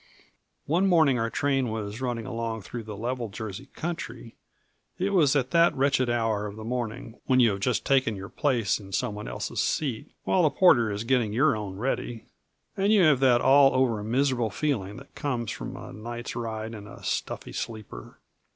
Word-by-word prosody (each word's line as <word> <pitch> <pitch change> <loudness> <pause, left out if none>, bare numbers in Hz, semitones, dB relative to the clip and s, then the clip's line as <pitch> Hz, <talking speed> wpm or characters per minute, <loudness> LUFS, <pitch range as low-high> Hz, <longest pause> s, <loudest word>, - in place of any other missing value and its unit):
One 175 +7 +2
morning 160 -9 +4
our 115 0 0
train 135 -1 0
was 110 +1 -5
running 120 -3 -2
along 115 -2 -4
through 120 +5 -6
the 105 -2 -7
level 120 +1 -3
Jersey 110 +4 -7
country; 130 -9 -6 0.6
it 190 +2 0
was 155 -8 +4
at 130 -2 +1
that 170 0 +4
wretched 130 -2 +2
hour 115 -3 0
of 100 - -8
the 110 - -8
morning 120 0 -4
when 130 -1 +4
you 120 -3 +5
have 100 - -3
just 115 +1 0
taken 130 -5 +2
your 95 0 -7
place 115 -4 0
in 95 -2 -12
someone 105 -3 -2
else's - - -4
seat 130 -8 -1
while 185 - +2
the 155 - +4
porter 120 - +4
is 100 +2 -3
getting 115 -3 +1
your 135 +2 +3
own 100 -3 -5
ready, 120 -1 -3 0.5
and 200 +2 +2
you 210 -4 +5
have 150 -5 +5
that 125 -3 +4
all 135 0 +6
over 120 -5 +1
miserable 120 0 +1
feeling 105 -8 -2
that 135 +2 -13
comes 120 -6 -2
from - - -6
a - - -9
night's 120 +3 -6
ride 110 -1 -4
in 105 -2 -9
a - - -12
stuffy - - -3
sleeper. 110 - -7
120 Hz, 190 wpm, -27 LUFS, 110-135 Hz, 0.6 s, all